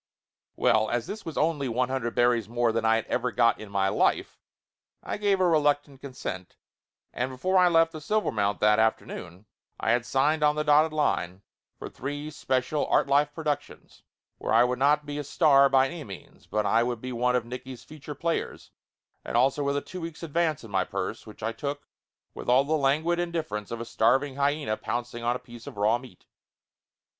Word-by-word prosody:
Well, 110 0 +2
as 120 -1 -1
this 215 +1 -7
was 160 - -6
only 150 -4 0
one 125 +2 0
hundred 130 -3 -2
berries 120 -3 +2
more 120 0 +1
than 115 0 -1
I 110 0 +4
had 115 - -1
ever 125 0 -1
got 115 0 +3
in 110 - -9
my 100 -1 +1
life - - 0 0.6
I - - -4
give 200 -2 +1
a 185 - +3
reluctant 145 -4 +1
con 140 -2 -9
sent, 90 -6 -6 0.6
and 125 +1 -2
before 185 +9 +1
I 180 - +6
left 165 -1 +4
the 155 - -7
Silvermount 110 - 0
that 105 +1 +4
afternoon 105 -4 -2 0.3
I 110 - +1
had 120 0 +2
signed 145 +6 +1
on 150 0 +3
the 150 - 0
dotted 150 +1 +4
line 95 - -1 0.3
for - - -7
three 145 +3 -6
special 135 0 -1
Artlife 145 +1 +3
productions, 150 -3 -5 0.4
where - - -3
I 115 +2 +6
would 125 0 -1
not 145 +2 +3
be 145 0 -5
a - - -3
star 140 -2 +4
by 135 -1 +4
any 160 +3 -6
means 100 -7 -12
but 105 -1 -1 0.2
would 120 -1 -2
be 130 +2 -6
one 125 +1 +1
of 125 -2 0
Nicky's 125 +1 -8
feature 150 -1 -9
players, 165 +3 -3 0.5
and - - -2
also 135 +4 +2
with 140 0 0
a - - -1
two 185 -1 -8
weeks' 165 0 -7
advance 160 -2 0
in 110 - -11
my 95 -1 +2
purse, - - -5
which 105 0 -12
I 115 - 0
took 140 +5 -5 0.5
with - - -7
all 130 +2 +5
the 150 +3 -2
languid 155 +4 +1
indifference 160 -12 -3
of 115 - -5
a 115 - -5
starving 130 +5 +1
hyena 140 -6 0
pouncing 120 0 -4
on 120 +1 +1
a - - -9
piece 120 -1 -12
of - - -9
raw 110 +4 +2
meat. 125 0 -15
135 Hz, 200 wpm, -27 LUFS, 115-150 Hz, 0.6 s, I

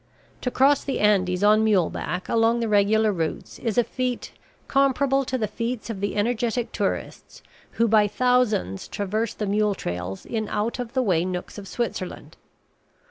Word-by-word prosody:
To 250 - -1
cross 275 +3 +3
the 275 - -2
Andes 190 -3 +2
on 215 +1 +5
mule 200 -6 +3
back 180 +1 -4
along 230 +1 +2
the 230 - -1
regular 215 +1 +3
routes 165 -3 -4
is 225 -2 -2
a 240 - +5
feat 250 0 -3 0.4
comparable 275 0 +2
to 260 - -1
the 220 -3 -1
feats 230 +2 -4
of 195 -3 -6
the 200 - -2
energetic 235 +2 0
tourists - - -4 0.3
who 230 - +2
by 215 -1 +4
thousands 230 - +1
traverse 210 +3 -2
the 210 - -3
mule 205 0 +1
trails 90 - -5
in 220 -2 -3
out 215 +4 -2
of 245 -1 -5
the 260 -1 +1
way 175 -7 +2
nooks 185 +2 -5
of 195 - -10
Switzerland. 220 -4 -4
220 Hz, 170 wpm, -24 LUFS, 200-245 Hz, 0.4 s, on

